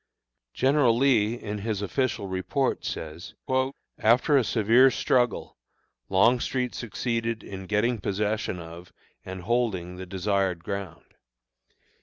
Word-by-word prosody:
General 130 -3 +3
Lee, 120 -4 +3
in 105 -3 -5
his 105 -1 -2
official 115 -1 -1
report, 95 +9 -1
says: 80 +2 -6 0.6
"After 125 +6 +4
a 135 - +5
severe 115 +4 +5
struggle, 125 -1 0 0.5
Longstreet 120 +5 +2
succeeded 115 0 -3
in 95 -1 -8
getting 110 +3 +1
possession 105 0 -1
of 85 +1 -10 0.3
and 95 0 -7
holding 95 -6 -1
the 95 0 -7
desired 95 -2 -1
ground. 100 -2 -6
105 Hz, 110 wpm, -26 LUFS, 95-120 Hz, 0.6 s, a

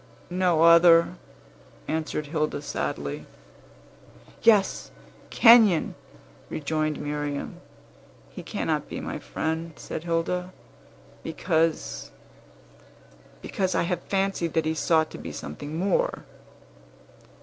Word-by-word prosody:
"No 180 -3 +2
other," 170 0 +7 0.7
answered 155 -1 -2
Hilda 150 -1 -2
sadly. 70 - -4 1.1
"Yes; 210 -4 +3 0.4
Kenyon!" 225 -8 +6 0.6
rejoined 155 0 -2
Miriam. 145 -1 -4 0.7
"He - - -8
cannot - - -2
be - - -5
my - - -5
friend," 160 +1 -3
said 155 - -7
Hilda, 180 +2 -2 0.7
"because 165 -2 -1 1.3
because 190 -2 -1
I - - +2
have 175 0 -2
fancied 195 -4 -1
that 160 -1 +1
he 160 - 0
sought 160 0 +1
to - - -9
be - - -7
something 145 - -7
more." 200 - 0
165 Hz, 95 wpm, -26 LUFS, 155-180 Hz, 1.3 s, other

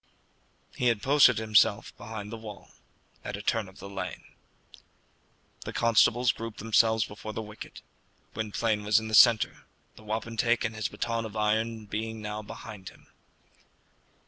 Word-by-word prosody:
He 125 - 0
had 115 -4 +1
posted 135 -3 +6
himself 110 -2 +2
behind 110 -3 -8
the 115 - -5
wall 105 -3 -10 0.5
at - - -5
a - - -7
turn 110 -2 0
of 95 - -18
the 100 - -9
lane. 95 -3 -6 1.4
The - - -6
constables 115 +1 +4
grouped 115 -1 -7
themselves 110 0 +3
before 110 +1 -8
the 110 - -4
wicket. 105 0 -11 0.5
Gwynplaine 110 0 -1
was 105 +1 +4
in 110 0 -6
the - - -7
centre, 115 0 +5 0.3
the - - -14
wapentake 115 +2 0
and 110 0 -3
his 110 -1 -1
baton 115 -1 -3
of 110 -1 -8
iron 110 +1 0
being 110 +2 -4
now 105 0 -5
behind 105 -2 -9
him. - - -21
110 Hz, 150 wpm, -28 LUFS, 105-115 Hz, 1.4 s, posted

